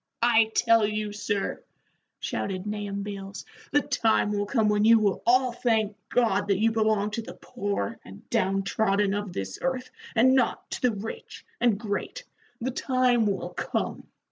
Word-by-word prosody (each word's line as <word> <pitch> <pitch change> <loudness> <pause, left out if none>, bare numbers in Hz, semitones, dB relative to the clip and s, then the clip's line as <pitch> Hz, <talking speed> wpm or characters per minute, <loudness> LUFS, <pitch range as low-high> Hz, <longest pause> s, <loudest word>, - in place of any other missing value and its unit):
"I 230 -2 +5
tell 230 -1 +4
you, 210 0 -3
sir," 205 -1 -2 0.6
shouted 190 -1 -3
Nahum 205 -1 -3
Beals, 195 -1 -7 0.3
"the 290 - +4
time 220 -4 +1
will 205 0 -1
come 220 -2 +2
when 210 0 +2
you 225 +1 +7
will 205 -3 +1
all 255 +1 +4
thank 220 -3 0
God 205 -5 +2
that 200 -2 +2
you 225 +3 +3
belong 215 -2 +1
to 230 - -3
the - - -10
poor 200 - -4
and 95 +2 -13
down 195 +1 +1
trodden 200 0 +1
of 205 -2 -3
this 95 - -5
earth, 260 -1 -2 0.2
and 255 +3 +5
not 260 -2 0
to - - -4
the 250 - +3
rich 215 +1 -7
and 235 -4 +2
great 215 - -4 0.4
the 255 +3 -2
time 250 -3 +2
will 200 -1 -2
come. - - -3
210 Hz, 170 wpm, -26 LUFS, 200-235 Hz, 0.6 s, you